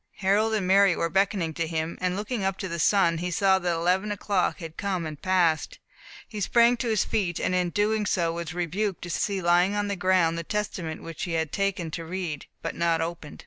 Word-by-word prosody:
Harold 210 +3 +2
and 205 -4 -1
Mary 195 -1 +5
were 165 - -1
beckoning 190 -3 +1
to 165 +1 -2
him; 160 0 -2
and 180 0 0
looking 210 +2 -3
up 190 0 0
to 190 - -4
the 170 -1 -4
sun, 170 -2 +3
he 180 +1 -2
saw 190 +1 +3
that 175 -1 -1
eleven 180 +5 +1
o'clock 200 -2 0
had 165 -3 -8
come 185 -4 -2
and 155 -2 -7
passed. 175 -4 +1 0.5
He 210 -2 -6
sprang 235 +4 +4
to 240 - -3
his 220 -3 +1
feet, 180 -6 -1
and - - 0
in 180 -1 +1
doing 210 +2 0
so, 170 -3 +1
was 170 -1 -5
rebuked 180 +3 -2
to 175 - -5
see 195 0 -1
lying 175 +3 +3
on 205 0 -1
the 200 - -1
ground 180 -3 +2
the - - -4
Testament 180 -4 -4
which 165 -1 -5
he 175 - -4
had 160 -2 -1
taken 195 -5 -1
to 165 - -5
read, 165 -3 -5 0.2
but - - -3
had - - -12
not 170 -1 +2
opened. 165 -2 -5
180 Hz, 225 wpm, -26 LUFS, 165-200 Hz, 0.5 s, Mary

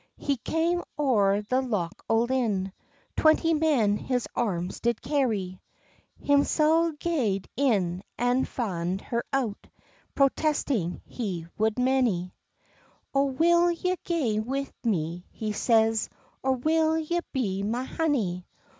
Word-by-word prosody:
He 280 -2 -1
cam 335 +7 0
oure 210 -8 +2
the 255 +3 +2
lock 205 -10 -3
o' 225 0 +4
Lynn, 225 -7 0 0.4
Twenty 320 +1 +4
men 280 -10 +2
his 250 0 -2
arms 185 -6 -1
did 235 -1 0
carry; 225 -9 -1 0.6
Himsel 310 +3 +3
gaed 260 - -1
in, 195 -10 +1 0.2
an' 245 +2 +2
fand 185 -5 -3
her 235 0 -2
out, 245 -7 -2 0.5
Protesting 275 - +1
he 190 -9 -4
would 220 +1 +1
many. 250 -9 +1 0.8
"O 275 0 +3
will 340 +6 +3
ye 365 +2 0
gae 265 -12 0
wi' 270 +5 -3
me," 175 -5 -1
he 215 -1 -4
says, 225 0 +2 0.3
"Or 265 0 +2
will 315 +4 +2
ye 320 +2 -1
be 200 -8 -1
my 230 +5 -1
honey? 235 - -1
245 Hz, 120 wpm, -27 LUFS, 205-290 Hz, 0.8 s, o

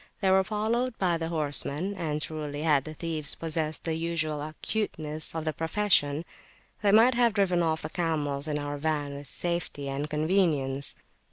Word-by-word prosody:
They 190 -1 +3
were 190 0 +5
followed 225 +4 -1
by 175 -3 +2
the 165 - -2
horsemen; 155 +3 0
and 155 -6 -2
truly, 150 0 -4
had 150 -4 +3
the 155 0 -7
thieves 155 -3 -1
possessed 160 -1 -3
the 165 - -1
usual 160 -2 -1
acuteness 155 -1 -2
of 160 -1 -3
the 155 - 0
profession, 165 -3 +2 0.6
they 205 -2 +4
might 230 +5 +7
have 235 -2 +3
driven 185 -4 +3
off 160 -1 0
the 155 - -3
camels 150 -4 -1
in 150 -1 -1
our 145 0 -4
van 145 -2 -1
with 140 0 -7
safety 170 -3 -3
and 140 +2 -3
convenience. 150 -4 +1
160 Hz, 170 wpm, -28 LUFS, 150-180 Hz, 0.6 s, might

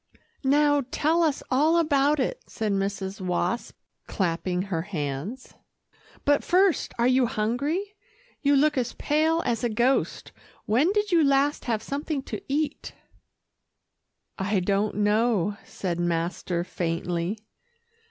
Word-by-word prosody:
"Now, 290 +1 +4
tell 320 +5 +1
us 310 -4 +1
all 305 +6 +4
about 295 -2 +3
it," - - -1
said 220 -2 -2
Mrs. 195 0 -2
Wasp, 180 +4 -2 0.3
clapping 180 0 -1
her 185 -5 -2
hands, 170 - -5 0.7
"but 290 0 +3
first, 375 -1 +2
are 235 - +2
you 255 0 +4
hungry? 280 - -1 0.5
You 285 -1 +3
look 295 0 +3
as 245 -1 -2
pale 315 +3 +1
as 235 0 -1
a 240 - +2
ghost. 240 +5 0 0.3
When 250 - +3
did 415 0 0
you 335 -2 +5
last 280 +1 +2
have 220 -3 -1
something 285 0 -3
to 215 - -6
eat?" 295 +1 -2 1.4
"I 195 +1 +1
don't 200 +3 0
know," 210 -1 +1
said 175 -3 -4
master 170 0 -1
faintly. 175 +2 -2
240 Hz, 125 wpm, -26 LUFS, 190-290 Hz, 1.4 s, you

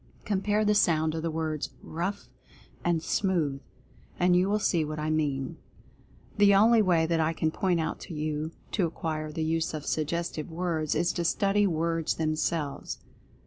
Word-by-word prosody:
Compare 210 +1 +1
the 210 - +4
sound 160 -6 +3
of 160 - -3
the 165 - -1
words 155 -1 -2
"ROUGH" 185 +5 -4 0.6
and 170 -2 +1
"SMOOTH"— 165 -8 0 0.6
and 180 0 +4
you 180 +2 +3
will 210 - +2
see 175 -5 +1
what 155 0 -4
I 155 +1 -1
mean. 140 -4 -1 0.8
The 200 -1 +7
only 225 +3 +6
way 175 -5 +3
that 165 0 +1
I 160 +1 +2
can 160 0 0
point 180 0 +1
out 160 - -2
to 165 - -8
you 155 +1 -2 0.2
to 185 -5 +1
acquire 155 -1 -4
the 160 +1 -2
use 160 0 0
of 150 -1 -6
Suggestive 160 0 -2
Words 165 -2 -1
is 170 +3 +1
to 175 - -1
study 200 +4 +2
Words 165 -1 0
themselves. 155 -2 -2
165 Hz, 170 wpm, -28 LUFS, 155-180 Hz, 0.8 s, The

